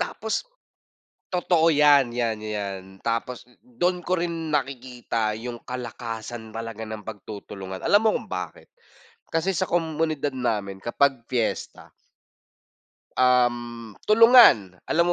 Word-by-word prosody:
Tapos 220 Hz, 0 st, -2 dB, 0.9 s
totoo 175 Hz, -2 st, +2 dB
yan, 145 Hz, -4 st, +5 dB
yan, 115 Hz, -2 st, -2 dB
yan, 100 Hz, -3 st, -4 dB, 0.2 s
tapos 115 Hz, +1 st, -2 dB, 0.2 s
dun 180 Hz, -8 st, -1 dB
ko 185 Hz, +2 st, 0 dB
rin 165 Hz, -2 st, -3 dB
nakikita 125 Hz, -6 st, -2 dB
yung 120 Hz, 0 st, -7 dB
kalakasan 115 Hz, -2 st, -6 dB
talaga 115 Hz, 0 st, -6 dB
ng 110 Hz, -1 st, -7 dB
pagtutulungan. 100 Hz, -3 st, -8 dB
Alam 205 Hz, +1 st, +5 dB
mo 220 Hz, -, +4 dB
kung -, -, -12 dB
bakit? -, -, -6 dB, 0.6 s
Kasi 165 Hz, +4 st, 0 dB
sa 185 Hz, +2 st, -1 dB
komunidad 160 Hz, -4 st, -1 dB
namin 105 Hz, -6 st, -2 dB
kapag 135 Hz, +1 st, +1 dB
fiesta 120 Hz, -3 st, -3 dB, 1.2 s
um, 120 Hz, -3 st, +1 dB, 0.2 s
tulungan. 215 Hz, -, +7 dB
Alam 170 Hz, +1 st, +3 dB
125 Hz, 110 wpm, -25 LUFS, 110-165 Hz, 1.2 s, tulungan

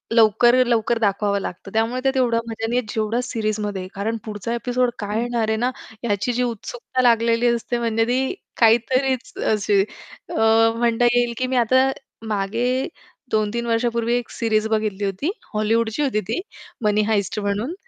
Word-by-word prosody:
लवकर-लवकर 235 Hz, +1 st, +4 dB
दाखवावं 200 Hz, -1 st, +1 dB
लागतं. 190 Hz, +3 st, -7 dB
त्यामुळे 230 Hz, +3 st, 0 dB
त्यात 270 Hz, 0 st, +2 dB
तेवढा 240 Hz, -3 st, +2 dB
मजा 225 Hz, 0 st, -3 dB
नाही 245 Hz, +1 st, +1 dB
जेवढी 220 Hz, +3 st, -1 dB
सीरीजमध्ये. 210 Hz, -5 st, -2 dB
कारण 220 Hz, +3 st, -2 dB
पुढचा 215 Hz, +1 st, -5 dB
ॲपिसोड 245 Hz, +1 st, 0 dB
काय 210 Hz, +2 st, -2 dB
येणार 235 Hz, -2 st, -1 dB
आहे 220 Hz, -, +1 dB
ना, 245 Hz, +3 st, 0 dB, 0.3 s
याची 210 Hz, +2 st, 0 dB
जी 250 Hz, +1 st, 0 dB
उत्सुकता 245 Hz, +2 st, -3 dB
लागलेली 230 Hz, 0 st, +3 dB
असते, 235 Hz, 0 st, 0 dB
म्हणजे 225 Hz, -1 st, +1 dB
ती 260 Hz, +5 st, 0 dB, 0.3 s
काहीतरीच 255 Hz, +3 st, +2 dB, 0.2 s
अशी 205 Hz, -1 st, +2 dB
अ, 220 Hz, -, -8 dB, 0.4 s
म्हणता 235 Hz, 0 st, +2 dB
येईल 240 Hz, -1 st, +2 dB
की 255 Hz, -, -1 dB
मी 255 Hz, -, -1 dB
आता 260 Hz, +3 st, +4 dB, 0.4 s
मागे 230 Hz, +6 st, 0 dB, 0.4 s
2-3 220 Hz, +2 st, 0 dB
वर्षांपूर्वी 235 Hz, 0 st, 0 dB
1 240 Hz, -, -5 dB
सीरीज 220 Hz, -1 st, 0 dB
बघितली 215 Hz, -2 st, -1 dB
होती. 195 Hz, -, -1 dB, 0.2 s
हॉलीवूडची 220 Hz, +4 st, +1 dB
होती 230 Hz, -7 st, 0 dB
ती, 185 Hz, -, -3 dB, 0.4 s
"मनी 210 Hz, 0 st, +3 dB
हाइस्ट" 205 Hz, -1 st, 0 dB
म्हणून. 205 Hz, -, -2 dB
230 Hz, 150 wpm, -22 LUFS, 215-245 Hz, 0.4 s, लवकर-लवकर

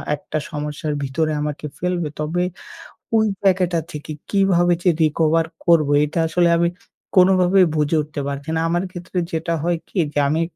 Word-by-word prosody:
একটা 155 Hz, +1 st, -5 dB
সমস্যার 150 Hz, 0 st, -3 dB
ভিতরে 155 Hz, +4 st, -1 dB
আমাকে 150 Hz, 0 st, -4 dB
ফেলবে। 175 Hz, -3 st, -1 dB
তবে 165 Hz, +4 st, -1 dB, 0.7 s
ওই 220 Hz, -, +3 dB, 0.2 s
জায়গাটা 180 Hz, -3 st, +2 dB
থেকে 150 Hz, +1 st, -7 dB, 0.2 s
কীভাবে 180 Hz, -3 st, +3 dB
যে 180 Hz, -, +4 dB
recover 160 Hz, +1 st, +2 dB, 0.2 s
করবো, 160 Hz, -4 st, +4 dB
এটা 160 Hz, +3 st, -3 dB
আসলে 170 Hz, +1 st, +2 dB
আমি 170 Hz, 0 st, +2 dB, 0.5 s
কোনোভাবেই 185 Hz, 0 st, +5 dB
বুঝে 150 Hz, +1 st, +1 dB
উঠতে 150 Hz, -1 st, -6 dB
পারছি 140 Hz, +2 st, -5 dB
না। -, -, +1 dB
আমার 175 Hz, +2 st, 0 dB
ক্ষেত্রে 180 Hz, +1 st, -7 dB
যেটা 165 Hz, +1 st, -2 dB
হয় 175 Hz, 0 st, +1 dB
কি 190 Hz, -, -3 dB
যে -, -, +1 dB
আমি, 160 Hz, +2 st, +1 dB
165 Hz, 160 wpm, -21 LUFS, 150-180 Hz, 0.7 s, কোনোভাবেই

